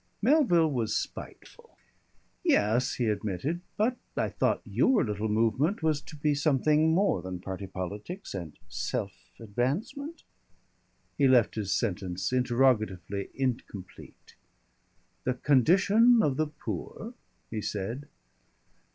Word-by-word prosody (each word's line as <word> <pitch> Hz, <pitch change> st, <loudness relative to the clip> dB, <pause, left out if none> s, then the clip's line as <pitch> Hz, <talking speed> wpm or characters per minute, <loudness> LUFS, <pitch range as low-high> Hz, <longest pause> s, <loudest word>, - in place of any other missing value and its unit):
Melville 215 Hz, -, +4 dB
was 115 Hz, -5 st, 0 dB
spiteful. -, -, -8 dB, 0.7 s
"Yes," 110 Hz, +4 st, +2 dB
he 125 Hz, -, 0 dB
admitted, 110 Hz, -, -2 dB, 0.2 s
"but 235 Hz, +4 st, +1 dB, 0.2 s
I -, -, +1 dB
thought -, -, 0 dB
your 260 Hz, -, +3 dB
little 105 Hz, 0 st, -2 dB
movement 115 Hz, -, +1 dB
was 155 Hz, -2 st, +1 dB
to 150 Hz, -, -12 dB
be 150 Hz, 0 st, +1 dB
something 150 Hz, +2 st, +3 dB
more 180 Hz, -, +2 dB
than 90 Hz, 0 st, -6 dB
party 95 Hz, +1 st, -6 dB
politics 105 Hz, -, -6 dB
and 85 Hz, -6 st, -6 dB
self -, -, -3 dB, 0.3 s
advancement 145 Hz, -, -3 dB, 0.5 s
?" -, -, -42 dB
He 140 Hz, -, +5 dB
left 125 Hz, -4 st, +4 dB
his 105 Hz, -3 st, -3 dB
sentence 95 Hz, -1 st, -1 dB
interrogatively 115 Hz, -7 st, +1 dB
incomplete. 120 Hz, -8 st, -5 dB, 0.9 s
"The 125 Hz, -, 0 dB
condition 195 Hz, -, +5 dB
of 140 Hz, -3 st, +1 dB
the 155 Hz, +2 st, 0 dB
poor," 215 Hz, +8 st, -6 dB, 0.4 s
he 110 Hz, -1 st, -3 dB
said. 115 Hz, +9 st, -4 dB
125 Hz, 115 wpm, -29 LUFS, 105-160 Hz, 0.9 s, He